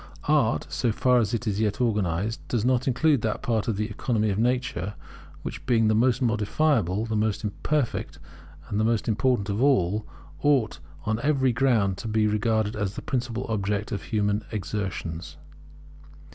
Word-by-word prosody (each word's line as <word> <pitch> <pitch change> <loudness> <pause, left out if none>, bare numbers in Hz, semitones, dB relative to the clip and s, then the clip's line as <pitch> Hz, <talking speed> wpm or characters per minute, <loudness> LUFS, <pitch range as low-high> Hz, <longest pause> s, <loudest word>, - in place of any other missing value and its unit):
Art, - - +2
so 120 - 0
far 125 +3 +3
as 110 -2 0
it 120 0 -2
is 105 -2 -1
yet 105 -2 0
organized, 105 -3 0
does 115 -2 0
not 130 +1 +2
include 140 +1 +3
that 110 -1 -2
part 110 -3 0
of 110 -4 0
the 105 - 0
economy 110 -1 0
of 100 - -1
nature 120 -4 -1 0.5
which, - - -6
being 115 -3 +3
the - - +3
most 120 +3 +2
modifiable, 110 - +1
the 110 -1 -2
most 105 +1 0
imperfect, 120 +6 -2 0.5
and 105 - -2
the - - +2
most 115 0 +1
important 115 -2 +1
of 100 +2 -1
all, 110 -7 +3 0.4
ought 135 - +2 0.3
on 110 +1 0
every 135 -3 +2
ground 115 -7 +2
to 115 - -6
be 110 0 +2
regarded 105 0 +1
as 105 -2 -2
the - - -6
principal 120 -2 -2
object 105 -1 -1
of 100 - -2
human 105 -1 0
exertions. 90 -6 -4
110 Hz, 170 wpm, -26 LUFS, 105-125 Hz, 0.5 s, far